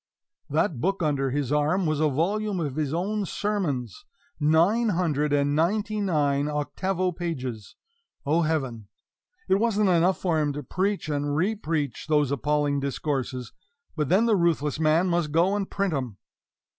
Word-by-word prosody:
That 155 - 0
book 195 0 0
under 140 -3 +1
his 140 0 -2
arm 150 +6 +2
was 155 -2 0
a 155 -1 +3
volume 195 +7 -1
of 145 -5 -3
his 150 -3 -1
own 200 +6 -1
sermons 180 - -2 0.4
nine 170 +10 +3
hundred 155 -6 0
and 145 0 +2
ninety 205 +6 0
nine 145 -6 +1
octavo 180 +6 -1
pages, 130 - -5 0.5
O 155 +4 +2
Heaven! 135 -10 -2 0.6
It 190 - +3
wasn't 215 -3 +2
enough 180 +1 +3
for 170 -4 0
him 145 -1 0
to 145 +1 -5
preach 190 +6 -1
and 145 -1 -1
repreach 165 -6 -1
those 150 -3 +2
appalling 145 +1 0
discourses, 135 -3 -3 0.4
but 150 -3 -1
then 195 +7 +4
the 225 -2 +3
ruthless 160 -5 +1
man 160 +3 +3
must 170 -4 0
go 175 +6 +3
and 200 -2 -2
print 195 -3 -1
'em! 125 -8 -3
155 Hz, 155 wpm, -26 LUFS, 145-185 Hz, 0.6 s, then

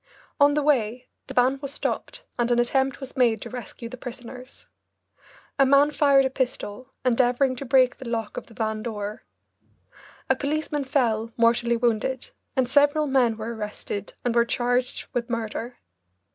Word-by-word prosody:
On 285 0 +5
the 300 - +1
way 250 -4 +1 0.2
the - - -8
van 255 +2 +3
was 280 -1 -5
stopped - - -4
and 240 0 +2
an 240 - +3
attempt 265 +3 +1
was 270 -2 -9
made 235 -4 +3
to - - -8
rescue 245 -1 -7
the 255 +2 -9
prisoners. 250 +1 -10 0.9
A - - +8
man 280 +2 +5
fired 280 -2 +4
a - - +1
pistol, 255 -1 -3
endeavouring 255 +1 +3
to 275 - -5
break 255 -1 +4
the 255 - -6
lock 225 -2 -3
of - - -6
the 225 - -16
van 220 -1 -2
door. 210 -2 -5 1.1
A 265 - +3
policeman 295 +1 -2
fell, 230 -5 +1
mortally 235 0 +3
wounded, 240 +2 -1 0.2
and 260 -2 +2
several 290 +3 +4
men 255 -5 +2
were 225 +2 -4
arrested 210 -2 -5
and 245 - +1
were 235 0 +5
charged 245 +1 0
with 240 0 -2
murder. 230 +1 -4
250 Hz, 165 wpm, -25 LUFS, 230-270 Hz, 1.1 s, A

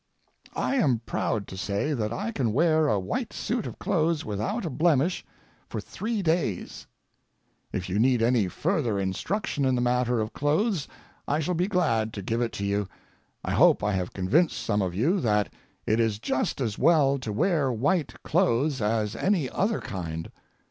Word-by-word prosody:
I 275 - 0
am 130 - +2
proud 105 -3 -1
to - - -7
say 100 - -1
that 110 -5 -2
I 205 - -3
can 125 - -1
wear 155 +2 +3
a 105 -8 +2
white 215 - -3
suit 240 -2 -2
of - - -8
clothes 165 -4 0
without 110 - -2
a 160 - -3
blemish 165 +1 +2 0.5
for - - -4
three 215 -2 -3
days. 160 - -1 0.8
If 90 -1 -3
you 95 +3 -1
need 125 0 +3
any 115 -4 +3
further 130 - 0
instruction 140 - -2
in 130 -1 +2
the - - 0
matter 125 -1 +1
of 110 0 -2
clothes 155 +4 0 0.4
I 145 - +1
shall 160 +3 -1
be 175 +2 +1
glad 115 - +1
to 100 - -6
give 115 +5 -1
it 120 - 0
to 100 - -3
you. 100 0 0 0.6
I - - -2
hope - - +5
I 105 - +1
have 90 -2 -2
convinced 130 - +2
some 105 -2 0
of 90 -2 -2
you 160 - +2
that 105 - +1 0.3
it 110 +2 +2
is 110 -3 +1
just 130 +6 -1
as 115 -6 -2
well 140 -5 +4
to 115 -4 -4
wear 145 - +1
white 145 +7 0
clothes 150 -5 +1
as 105 0 0
any 170 - +1
other 210 +3 0
kind. 80 -4 -5
125 Hz, 180 wpm, -27 LUFS, 105-165 Hz, 0.8 s, hope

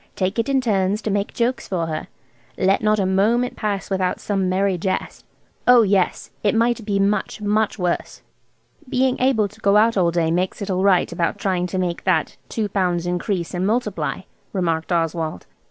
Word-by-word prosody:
Take 190 +3 -1
it 230 - 0
in 270 -1 +2
turns 200 -3 +1
to 215 - -1
make 200 0 -1
jokes 245 +1 -1
for 175 -3 -1
her. 155 -1 -4 0.5
Let 190 +1 +2
not 215 0 +2
a 195 - +1
moment 220 +6 +2
pass 205 -2 -3
without 185 -1 0
some 195 -3 -1
merry 190 +1 +1
jest?' 185 +2 -3 0.4
Oh 245 -2 +7
yes, 195 -3 0
it 210 +1 +1
might 235 +1 +1
be 200 -1 +1
much, 200 +1 0
much 210 +1 0
worse." 180 -3 -2 0.7
"Being 255 0 +1
able 250 -5 +2
to - - -19
get 200 0 +3
out 220 +1 +4
all 175 -2 +3
day 165 -1 0
makes 180 +2 -1
it 200 -2 -3
all 185 0 0
right 190 -2 +3
about 170 - -1
trying 180 -2 -1
to 185 - -4
make 180 -2 -2
that 170 -5 +1
two 220 -2 -1
pounds 180 -3 0
increase 180 0 -2
and 180 +1 0
multiply," 240 +4 -1 0.3
remarked 165 -3 -1
Oswald. 165 - -1
195 Hz, 185 wpm, -21 LUFS, 180-215 Hz, 0.7 s, Oh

